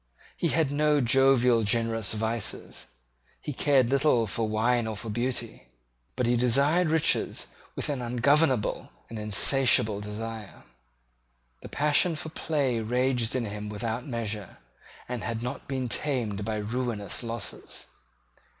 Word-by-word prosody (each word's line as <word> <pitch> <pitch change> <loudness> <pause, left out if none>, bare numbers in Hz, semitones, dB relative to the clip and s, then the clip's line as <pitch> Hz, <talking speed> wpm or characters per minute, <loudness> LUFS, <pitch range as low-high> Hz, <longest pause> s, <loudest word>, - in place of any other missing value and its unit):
He 170 - 0
had 160 -3 +1
no 150 0 +2
jovial 125 -2 +4
generous 115 0 0
vices. 110 0 -4 0.5
He 150 - -5
cared 135 -2 +2
little 135 -4 +3
for 110 +2 -2
wine 115 +2 +1
or 110 - -3
for 110 +2 -6
beauty: 120 - -3 0.5
but 125 - 0
he 120 +1 +2
desired 140 +8 +3
riches 160 0 +1 0.3
with - - -3
an 140 -4 -2
ungovernable 130 +1 +1 0.2
and 115 - -5
insatiable 105 0 +4
desire. 110 0 -7 1.0
The - - -10
passion 150 +3 +3
for 160 - -6
play 140 -6 -1
raged 125 +1 0
in 125 -2 -1
him 105 0 -6
without 115 +4 -4
measure, 110 -5 -5 0.5
and 125 -3 -4
had 115 -1 -3
not 125 - -5
been 130 -2 -2
tamed 115 -4 -1
by 110 +1 -2
ruinous 110 0 -2
losses. 115 -1 -6
120 Hz, 130 wpm, -27 LUFS, 110-135 Hz, 1.0 s, jovial